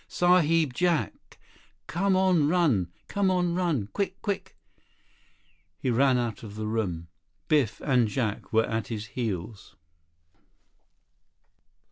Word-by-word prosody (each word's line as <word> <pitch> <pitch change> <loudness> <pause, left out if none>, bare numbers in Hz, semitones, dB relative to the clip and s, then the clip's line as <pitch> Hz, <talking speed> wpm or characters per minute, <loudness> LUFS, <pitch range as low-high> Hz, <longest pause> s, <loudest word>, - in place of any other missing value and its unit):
"Sahib 165 -5 +3
Jack! 175 +2 -1 0.5
Come 190 +3 +1
on 185 -6 +3
run! 150 - +2 0.2
Come 200 -1 +1
on 180 -2 +1
run! 170 - 0
Quick! 195 -2 -2
Quick!" 200 -2 -4 1.2
He 130 - -1
ran 130 +2 +3
out 120 -3 -2
of 105 -2 -9
the 110 0 -4
room. 95 -7 -2 0.4
Biff 145 -8 +2
and 125 -5 +2
Jack 110 -3 -3
were 110 0 +3
at 110 -1 -3
his 110 -2 -5
heels. 105 -5 -5
135 Hz, 115 wpm, -27 LUFS, 110-175 Hz, 1.2 s, Sahib